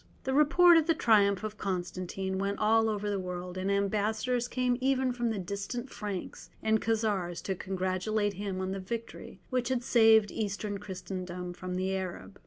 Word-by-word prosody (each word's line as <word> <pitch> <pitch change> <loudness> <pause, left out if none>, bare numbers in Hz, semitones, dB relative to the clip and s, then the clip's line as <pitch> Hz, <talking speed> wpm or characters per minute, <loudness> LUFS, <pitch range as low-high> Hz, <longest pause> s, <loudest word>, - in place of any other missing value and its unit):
The 265 - -1
report 330 +4 +6
of 320 -1 +2
the 330 - +3
triumph 205 -6 +3
of 215 0 -5
Constantine 185 0 -3
went 200 +1 -1
all 225 +1 +3
over 210 -1 -2
the 200 -1 -1
world, 180 0 -5
and 190 +1 -1
ambassadors 215 +5 0
came 250 0 0
even 260 -1 +2
from 240 -1 -1
the 220 - -2
distant 200 +7 -4
Franks 205 -3 -6
and 220 0 +2
Khazars 205 -6 0
to 195 - -1
congratulate 190 +3 -1
him 195 -1 -4
on 190 0 -2
the 195 - -3
victory 230 +5 -7
which 250 -1 0
had 255 -2 0
saved 220 -4 +5
Eastern 205 -1 -3
Christendom 180 -1 -6
from 180 +1 -5
the 190 +1 -1
Arab. 175 - -6
205 Hz, 175 wpm, -30 LUFS, 185-225 Hz, -, report